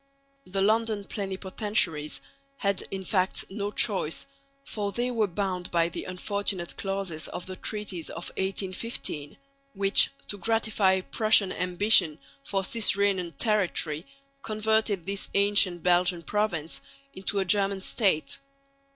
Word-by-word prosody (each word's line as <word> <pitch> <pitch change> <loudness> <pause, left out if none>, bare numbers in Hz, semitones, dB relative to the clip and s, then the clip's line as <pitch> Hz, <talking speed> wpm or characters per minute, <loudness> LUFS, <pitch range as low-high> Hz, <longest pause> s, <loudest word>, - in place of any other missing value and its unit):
The 195 +1 -1
London 220 0 +2
Plenipotentiaries 190 -7 -2 0.4
had 200 -1 -1
in 190 -1 -5
fact 185 0 0
no 200 0 -3
choice, 190 -6 +2 0.4
for 205 -6 -3
they 240 +4 -1
were 225 -3 +1
bound 185 -1 -3
by 170 -1 +2
the - - -6
unfortunate 185 -1 -2
clauses 195 -5 -3
of 180 - -6
the 185 - -6
treaties 200 -5 -4
of 170 - -6
1815, 190 -5 -3 0.4
which, 195 0 +5 0.2
to 205 - -2
gratify 215 -4 +2
Prussian 215 -1 +3
ambition 180 -3 +4 0.3
for 195 -8 -1
cis 220 +1 +2
Rhenan 190 -4 +1
territory, 175 - 0 0.3
converted 215 -4 +1
this 195 0 -2
ancient 200 -4 +3
Belgian 175 -1 +2
province 165 -9 -2 0.3
into 190 +2 -3
a 195 - +1
German 195 0 +2
state. 185 - 0
195 Hz, 125 wpm, -27 LUFS, 180-210 Hz, 0.4 s, which